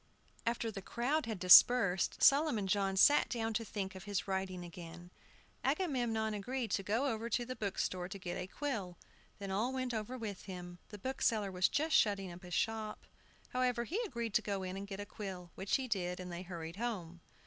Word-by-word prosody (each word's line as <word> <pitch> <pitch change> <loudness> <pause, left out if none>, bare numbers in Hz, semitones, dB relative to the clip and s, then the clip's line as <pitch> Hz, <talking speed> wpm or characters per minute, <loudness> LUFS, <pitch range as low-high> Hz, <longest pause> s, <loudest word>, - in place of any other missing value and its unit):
After 230 -1 0
the 200 -2 -6
crowd 255 +8 -1
had 220 -3 -3
dispersed, 185 +1 +7
Solomon 275 -7 +5
John 195 0 +1
sat 290 +9 +6
down 225 -2 -1
to 230 - 0
think 195 -3 -4
of 190 -1 -10
his 205 -2 -2
writing 190 -2 -2
again. 175 +1 -10 0.5
Agamemnon 245 - 0
agreed 230 +2 -3
to 195 - +1
go 220 +7 0
over 230 -3 -1
to 240 +1 0
the 255 +1 -5
bookstore 185 -4 -2
to 200 - -6
get 180 -2 -5
a 180 - -4
quill. 205 - -4 0.4
They 200 - -6
all 220 +6 0
went 255 -2 -2
over 225 +3 -3
with 210 -5 -6
him. 180 -2 -8
The 210 - -8
bookseller 215 -3 0
was 180 0 +2
just 315 +2 +1
shutting 195 -3 +3
up 175 +1 -10
his 180 -2 -5
shop. 220 -1 -2 0.4
However, 250 -2 +1
he 360 - -2
agreed 235 - -4
to - - +4
go 200 -2 -2
in 185 0 -4
and 200 +1 -6
get 195 -1 -6
a 205 - -4
quill, 190 -4 -7
which 190 +1 -1
he 265 -1 -1
did, 180 -5 -1
and 180 -1 -6
they 170 +1 -5
hurried 170 -2 -7
home. 180 -8 -4
205 Hz, 200 wpm, -35 LUFS, 185-235 Hz, 0.5 s, dispersed